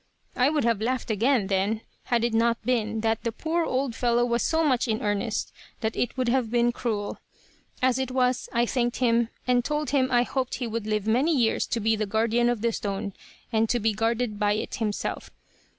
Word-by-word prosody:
"I 255 +2 +3
would 300 -2 0
have 230 -3 +1
laughed 245 0 -1
again, 230 +1 +2
then, 200 +3 0 0.2
had 235 -2 +1
it 235 -1 0
not 230 0 +1
been 225 -3 0
that 225 0 0
the 230 - -1
poor 330 +7 -1
old 260 -4 -1
fellow 240 0 +2
was 235 -1 0
so 325 0 +1
much 260 -5 +2
in 220 -1 0
earnest 210 +2 -2 0.3
that 220 0 -1
it 245 - -2
would 255 -1 0
have 240 -1 +1
been 240 +1 +2
cruel. 220 -4 -3 0.6
As 260 0 +3
it 265 -1 -1
was, 255 -1 0
I 235 0 +2
thanked 240 0 -1
him, 235 -2 +2 0.2
and 245 -1 +2
told 300 +2 -2
him 270 -2 +3
I 240 -1 +4
hoped 260 0 -2
he 250 - -3
would 225 -1 -4
live 215 -1 -1
many 265 +8 +2
years 230 -3 +1
to 230 - -1
be 225 +1 +2
the 215 -1 -2
guardian 230 +3 +2
of 240 -3 -1
the 235 0 +1
stone, 200 -1 -3 0.4
and 220 0 +2
to 240 - +2
be 220 0 +1
guarded 225 0 -1
by 205 0 +2
it 215 - -3
himself. 215 -4 -3
235 Hz, 215 wpm, -26 LUFS, 220-250 Hz, 0.6 s, I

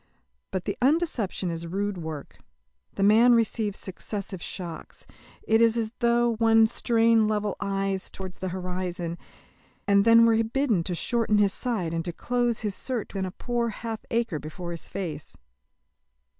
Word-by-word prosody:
But 185 -2 -3
the - - -2
undeception 255 - +1
is 165 0 -5
rude 195 +2 -2
work. 160 -3 -7 0.6
The 195 - 0
man 230 +4 +6
receives 220 -3 0
successive 195 0 -5
shocks. 170 -3 -7 0.4
It 225 +1 +3
is 230 0 +4
as 220 -1 -1
though 235 -1 +2
one 225 0 +5
strained 230 -1 +3
level 210 -2 -1
eyes 195 -1 -2
towards 190 -1 -8
the 190 - -3
horizon, 180 -2 -4 0.7
and 200 0 +5
then 230 +1 +7
were 225 0 +4
bidden 225 -5 +1
to 180 - -2
shorten 225 +2 +1
his 200 -2 +3
sight 210 -10 -2
and 165 0 -1
to 175 - -4
close 240 +3 0
his 210 -2 -1
search 245 +1 -3
within 190 -2 -2
a - - -6
poor 240 +3 -2
half 225 0 -5
acre 230 -9 0
before 170 +4 -7
his 170 - -8
face. 160 -7 -6
210 Hz, 155 wpm, -26 LUFS, 185-230 Hz, 0.7 s, then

